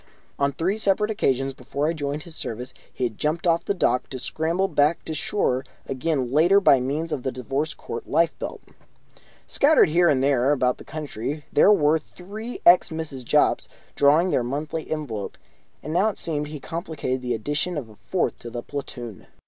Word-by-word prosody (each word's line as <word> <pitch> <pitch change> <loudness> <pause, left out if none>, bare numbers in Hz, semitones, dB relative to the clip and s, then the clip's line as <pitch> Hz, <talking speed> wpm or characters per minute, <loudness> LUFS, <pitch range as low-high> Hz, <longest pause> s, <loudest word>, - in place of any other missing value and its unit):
On 140 0 +2
three 180 +9 -1
separate 210 +1 +2
occasions 135 - 0
before 140 +2 -3
I 165 - +1
joined 145 -1 -3
his 170 -2 -8
service 125 0 -5 0.2
he - - -5
had 115 -4 -2
jumped 155 +3 -1
off 170 -1 +2
the 200 - 0
dock, 125 -8 +1
to 130 - -5
scramble 165 +8 0
back 150 -1 +1
to 160 - -4
shore 155 -9 0 0.2
again 135 -2 -1
later 170 +8 +5
by 140 -9 +5
means 145 +6 -2
of 150 -4 -2
the 130 - -2
Divorce 135 +5 -3
Court - - -7
lifebelt. 165 0 0 0.8
Scattered 295 - +4
here 175 +2 +4
and 135 -2 +2
there 135 0 +3
about 125 -3 +1
the - - -10
country 150 -1 -5
there 195 - +6
were 160 -5 +4
three 210 +9 -8
ex 175 +1 +7
Mrs. 160 -5 -5
Jopps, - - +2 0.3
drawing 155 +6 +4
their - - +2
monthly 150 +5 -4
envelope, 125 -10 -4 0.5
and 155 - -4
now, 200 +5 +3
it 210 - -6
seemed, 150 -2 -1
he 150 0 -7
contemplated 160 -5 -4
the 125 -1 -1
addition 145 +9 -2
of 135 -6 -4
a 110 - -15
fourth 185 - -2
to 120 - -8
the 120 0 -6
platoon. 125 -7 -7
150 Hz, 185 wpm, -24 LUFS, 130-170 Hz, 0.8 s, ex